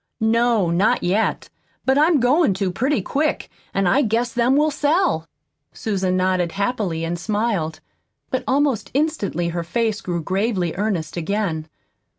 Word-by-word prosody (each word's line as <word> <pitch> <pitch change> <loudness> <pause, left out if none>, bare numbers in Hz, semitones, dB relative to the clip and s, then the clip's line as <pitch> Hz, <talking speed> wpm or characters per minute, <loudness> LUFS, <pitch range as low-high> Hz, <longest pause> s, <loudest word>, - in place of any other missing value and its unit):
"No, 225 -4 +2
not 185 +5 +2
yet; 200 +5 0 0.3
but 265 - +3
I'm 305 +1 +4
goin' 255 - +3
to 190 -1 -1
pretty 250 +3 0
quick, 300 +8 -1 0.2
an' 195 0 0
I 260 +10 +4
guess 235 0 0
them 245 +2 +2
will 300 +2 +3
sell." 295 - +1 0.5
Susan 190 -4 -1
nodded 185 -2 +1
happily, 200 -5 -1
and 170 +1 -2
smiled. 205 -5 -1 0.5
But 260 - -1
almost 275 -3 +1
instantly 215 - 0
her 170 0 -3
face 220 +4 -1
grew 170 -2 -3
gravely 190 -2 0
earnest 185 -6 -2
again. 170 -3 -2
210 Hz, 145 wpm, -21 LUFS, 175-250 Hz, 0.5 s, I'm